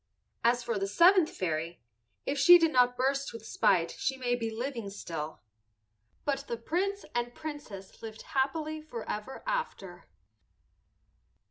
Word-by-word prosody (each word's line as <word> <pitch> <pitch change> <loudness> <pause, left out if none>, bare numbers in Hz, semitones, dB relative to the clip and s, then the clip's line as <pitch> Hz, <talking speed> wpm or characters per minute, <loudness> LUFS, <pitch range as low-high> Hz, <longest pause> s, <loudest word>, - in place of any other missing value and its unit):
As 240 +1 +3
for 230 -4 -1
the 195 - -1
seventh 345 - +5
fairy, 165 -1 -3 0.5
if 280 0 -1
she 350 +5 +10
did 330 -2 +2
not 245 -1 +4
burst 275 +2 0
with 230 -1 -9
spite 170 -6 +2
she 265 0 -2
may 245 -2 0
be 230 -2 -1
living 230 -1 -4
still. 160 - -6 0.8
But 280 -1 -1
the 235 - -3
Prince 385 - -2
and 240 0 -2
Princess 290 -11 -8
lived 220 -1 -8
happily 310 +3 -1
forever 240 -4 -6
after. 475 - -3
245 Hz, 135 wpm, -30 LUFS, 210-295 Hz, 0.8 s, she